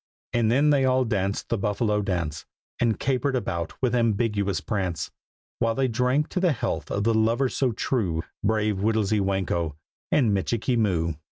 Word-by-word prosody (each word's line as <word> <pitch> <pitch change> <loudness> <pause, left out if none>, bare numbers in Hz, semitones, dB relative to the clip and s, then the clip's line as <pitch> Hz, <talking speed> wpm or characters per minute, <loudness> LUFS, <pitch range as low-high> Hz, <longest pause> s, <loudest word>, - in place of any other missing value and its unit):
And 115 -2 +2
then 145 +4 +4
they 140 -2 +3
all 130 0 +3
danced 100 -3 -1
the 115 - 0
Buffalo 105 +1 0
dance, 85 -6 -3 0.3
And 115 -2 +1
capered 135 +1 0
about 85 -9 -3
with 125 - +2
ambiguous 110 -4 +1
prance; 95 -5 -3 0.5
While 115 -1 +1
they 135 -1 +2
drank 125 +5 +1
to 185 - -2
the 180 -4 +3
health 115 - -3
of 100 - -1
the 115 +1 +3
lovers 115 +4 +2
so 130 -3 +2
true, 100 -8 -1 0.2
Brave 105 -1 +1
Whittlesy 110 0 +1
Whanko 95 -5 -1 0.4
and 120 -8 +3
Michikee 115 +5 0
Moo. 90 -8 +1
110 Hz, 165 wpm, -25 LUFS, 100-125 Hz, 0.5 s, then